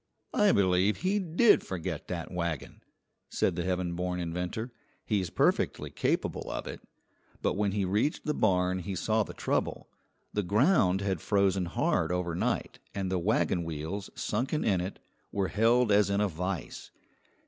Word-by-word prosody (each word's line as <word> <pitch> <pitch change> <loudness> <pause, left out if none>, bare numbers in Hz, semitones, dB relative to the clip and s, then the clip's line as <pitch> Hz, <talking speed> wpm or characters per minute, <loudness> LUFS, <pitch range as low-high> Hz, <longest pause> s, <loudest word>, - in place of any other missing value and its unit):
"I 210 -1 +5
believe 95 - +2
he 195 +3 +1
did 190 +5 +4
forget 90 -4 -4
that 85 -2 -4
wagon," 85 -5 -4 0.5
said 85 - +1
the 85 - -2
heaven 90 -1 -1
born 90 +1 -2
inventor; 90 +7 -3 0.3
"he's 95 -5 0
perfectly - - +1
capable - - -1
of - - -4
it." - - -7 0.6
But - - +2
when 100 0 0
he 100 -2 0
reached 105 +11 0
the 150 - +1
barn 95 -6 +2
he 95 +2 -4
saw 110 +6 +1
the - - -5
trouble. - - -1 0.5
The 105 - +1
ground 100 - +3
had 95 -5 -1
frozen 100 -2 +2
hard 85 -1 0
overnight, 90 -1 -1 0.2
and 95 -2 -2
the 95 - +1
wagon 95 -2 +1
wheels 80 +5 -4
sunken 130 +8 -1
in 95 -4 +2
it 95 +2 -5 0.3
were 100 -2 0
held 115 +1 +3
as 100 0 +4
in 100 0 +1
a 105 - +3
vise. 90 -1 -4
95 Hz, 160 wpm, -29 LUFS, 90-105 Hz, 0.6 s, I